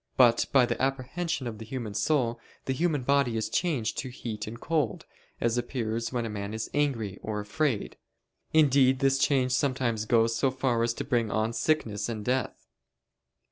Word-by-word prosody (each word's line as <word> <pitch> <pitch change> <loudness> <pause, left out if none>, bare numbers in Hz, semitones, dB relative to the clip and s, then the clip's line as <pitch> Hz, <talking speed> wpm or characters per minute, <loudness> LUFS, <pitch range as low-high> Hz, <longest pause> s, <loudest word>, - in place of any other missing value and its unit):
But 120 -2 +5
by 130 -3 +6
the - - -3
apprehension 135 +3 -1
of 110 -3 -5
the - - -6
human 115 -3 -5
soul 120 +1 +1 0.3
the 130 - 0
human 150 -2 0
body 140 -3 +2
is 110 - -2
changed 145 -11 0
to 130 - -4
heat 110 -4 -6
and 115 +2 -7
cold, 150 -9 -1 0.3
as 120 +1 +1
appears 115 -2 -3
when 120 -2 -1
a - - -2
man 105 0 -4
is 110 0 -4
angry 115 -10 -1
or 105 -1 -3
afraid: 115 +2 -1 0.5
indeed 135 -4 +5
this 135 0 +2
change 130 -2 +2
sometimes 125 -5 0
goes 115 0 +3
so 135 +3 +2
far 130 -2 0
as 115 0 +1
to - - -3
bring 120 -5 0
on 110 +2 0
sickness 115 -9 0
and 110 -3 -4
death. 130 +1 -1
120 Hz, 180 wpm, -28 LUFS, 110-135 Hz, 0.5 s, by